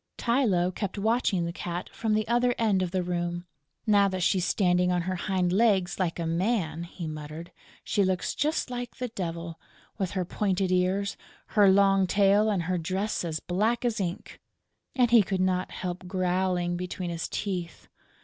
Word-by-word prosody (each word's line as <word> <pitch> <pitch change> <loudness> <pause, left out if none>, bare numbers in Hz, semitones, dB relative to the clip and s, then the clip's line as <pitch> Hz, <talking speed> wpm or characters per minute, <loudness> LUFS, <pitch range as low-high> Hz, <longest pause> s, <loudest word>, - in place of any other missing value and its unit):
Tylô 205 -8 +1
kept 200 +1 -4
watching 210 -4 +1
the 170 - -4
Cat 175 0 -4
from 220 -2 0
the 215 0 0
other 240 +1 +2
end 210 -5 +2
of 185 - -1
the 185 0 -1
room: 175 0 -3 0.4
"Now 205 -2 +5
that 185 -2 -2
she's 185 +1 +2
standing 180 -2 +2
on 175 -1 +1
her 185 +2 -2
hind 180 -1 0
legs 195 -4 +2
like 175 -3 0
a 170 - -2
man," 170 -1 -1
he 170 0 -8
muttered, 155 +2 -7 0.3
"she 205 - +1
looks 185 -1 0
just 300 -3 -1
like 245 -1 -5
the 250 -1 -4
Devil, 170 -5 -5 0.4
with 190 -3 -1
her 185 - 0
pointed 190 0 0
ears, 185 +2 +1 0.3
her 205 -2 +5
long 195 -1 +4
tail 200 +3 +4
and 195 -5 0
her 180 +1 -1
dress 190 +6 -2
as 160 -2 -2
black 215 +7 0
as 235 -2 0
ink!" 180 -2 -5 0.5
And 245 -3 +3
he 235 -2 +8
could 190 -1 -2
not 185 0 +1
help 180 0 -5
growling 180 -1 0
between 180 0 -4
his 170 -1 -4
teeth. 180 -5 -4
185 Hz, 180 wpm, -27 LUFS, 175-205 Hz, 0.5 s, he